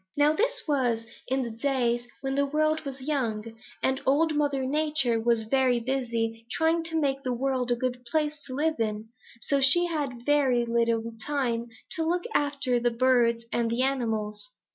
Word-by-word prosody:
Now 295 Hz, +1 st, +4 dB
this -, -, 0 dB
was 245 Hz, -6 st, +1 dB, 0.2 s
in 265 Hz, +1 st, 0 dB
the 235 Hz, -, -4 dB
days 240 Hz, 0 st, 0 dB
when 270 Hz, 0 st, -2 dB
the 280 Hz, +1 st, +1 dB
world 310 Hz, +2 st, +1 dB
was 270 Hz, -1 st, -6 dB
young, 230 Hz, -6 st, -2 dB, 0.3 s
and 265 Hz, +1 st, +1 dB
Old 305 Hz, +4 st, +3 dB
Mother 285 Hz, -3 st, 0 dB
Nature 295 Hz, -4 st, +1 dB
was 230 Hz, -1 st, +2 dB
very 255 Hz, +1 st, +2 dB
busy 230 Hz, -2 st, -2 dB
trying 325 Hz, +3 st, +1 dB
to 325 Hz, 0 st, 0 dB
make 275 Hz, -2 st, 0 dB
the 255 Hz, -2 st, -2 dB
world 260 Hz, -1 st, -1 dB
a 240 Hz, -, +4 dB
good 245 Hz, 0 st, -3 dB
place 300 Hz, +3 st, -1 dB
to 255 Hz, -, -6 dB
live 310 Hz, 0 st, 0 dB
in, 215 Hz, 0 st, -2 dB, 0.3 s
so 280 Hz, -1 st, +1 dB
she 345 Hz, +7 st, +6 dB
had 280 Hz, -8 st, -3 dB
very 270 Hz, -5 st, +3 dB
little 230 Hz, -1 st, 0 dB
time 245 Hz, -5 st, -1 dB, 0.2 s
to 325 Hz, -, -1 dB
look 350 Hz, +2 st, 0 dB
after 285 Hz, -4 st, +1 dB
the 240 Hz, 0 st, +2 dB
birds 235 Hz, -1 st, +2 dB
and 235 Hz, -1 st, +1 dB
the 235 Hz, +3 st, +1 dB
animals. 225 Hz, -, -2 dB
260 Hz, 175 wpm, -27 LUFS, 235-290 Hz, 0.3 s, she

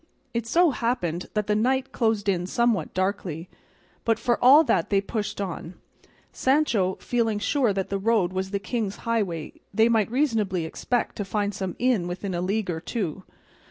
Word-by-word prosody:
It 235 Hz, -1 st, -2 dB
so 340 Hz, +6 st, +4 dB
happened 230 Hz, -9 st, -2 dB
that 210 Hz, -1 st, +1 dB
the 210 Hz, -, +1 dB
night 260 Hz, +4 st, +1 dB
closed 220 Hz, -3 st, 0 dB
in 180 Hz, -2 st, +1 dB
somewhat 230 Hz, -5 st, +1 dB
darkly, 185 Hz, -3 st, -2 dB, 0.5 s
but 225 Hz, -1 st, +2 dB
for 240 Hz, -1 st, 0 dB
all 280 Hz, +6 st, +8 dB
that 175 Hz, -, +1 dB
they 200 Hz, -, +3 dB
pushed 210 Hz, +1 st, -4 dB
on, 185 Hz, -2 st, -5 dB, 0.6 s
Sancho 240 Hz, -10 st, +2 dB
feeling 230 Hz, -3 st, 0 dB
sure 245 Hz, +2 st, +1 dB
that 195 Hz, -1 st, -1 dB
as -, -, -26 dB
the 195 Hz, -, 0 dB
road 200 Hz, -4 st, +2 dB
was 190 Hz, 0 st, -2 dB
the 200 Hz, -, -1 dB
king's 205 Hz, 0 st, -3 dB
highway 200 Hz, -9 st, -1 dB, 0.2 s
they 220 Hz, +3 st, +4 dB
might 220 Hz, -3 st, +2 dB
reasonably 220 Hz, -, 0 dB
expect 245 Hz, +8 st, -2 dB
to 205 Hz, -, -1 dB
find 205 Hz, +1 st, -1 dB
some 190 Hz, -2 st, -4 dB
inn 240 Hz, -8 st, +1 dB
within 185 Hz, +2 st, -4 dB
a 175 Hz, -, -1 dB
league 195 Hz, +1 st, -1 dB
or 160 Hz, -, -3 dB
two. 190 Hz, -1 st, -4 dB
210 Hz, 180 wpm, -25 LUFS, 185-235 Hz, 0.6 s, all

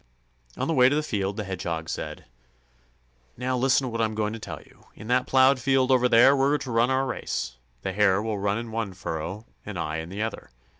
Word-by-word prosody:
On -, -, -1 dB
the 165 Hz, -, +1 dB
way 130 Hz, -3 st, +6 dB
to 145 Hz, -, +1 dB
the 155 Hz, -, 0 dB
field, 100 Hz, -6 st, -2 dB
the 105 Hz, -, -2 dB
Hedgehog 85 Hz, -4 st, -4 dB
said: -, -, -5 dB, 1.1 s
"Now, 130 Hz, +1 st, -1 dB
listen 130 Hz, +2 st, +2 dB
to -, -, -3 dB
what 115 Hz, 0 st, -2 dB
I'm 110 Hz, -1 st, 0 dB
going 105 Hz, 0 st, -1 dB
to 115 Hz, -, -6 dB
tell -, -, -7 dB
you. -, -, -23 dB
In -, -, -11 dB
that 125 Hz, +1 st, +2 dB
plowed 130 Hz, 0 st, +5 dB
field 135 Hz, 0 st, +2 dB
over 125 Hz, -1 st, +4 dB
there 125 Hz, +4 st, +7 dB
we're 140 Hz, +2 st, +2 dB
to 135 Hz, -3 st, -6 dB
run 115 Hz, +2 st, +3 dB
our 130 Hz, 0 st, +1 dB
race. -, -, -4 dB, 0.3 s
The 95 Hz, -, -2 dB
Hare 100 Hz, -1 st, +3 dB
will 110 Hz, -1 st, -2 dB
run 100 Hz, +1 st, 0 dB
in 115 Hz, 0 st, -6 dB
one 110 Hz, -3 st, -3 dB
furrow, 90 Hz, +4 st, -5 dB, 0.2 s
and 105 Hz, -3 st, -7 dB
I 80 Hz, -1 st, -2 dB
in 80 Hz, +1 st, -6 dB
the 100 Hz, +4 st, -3 dB
other. 110 Hz, -, -5 dB
115 Hz, 230 wpm, -26 LUFS, 100-130 Hz, 1.1 s, there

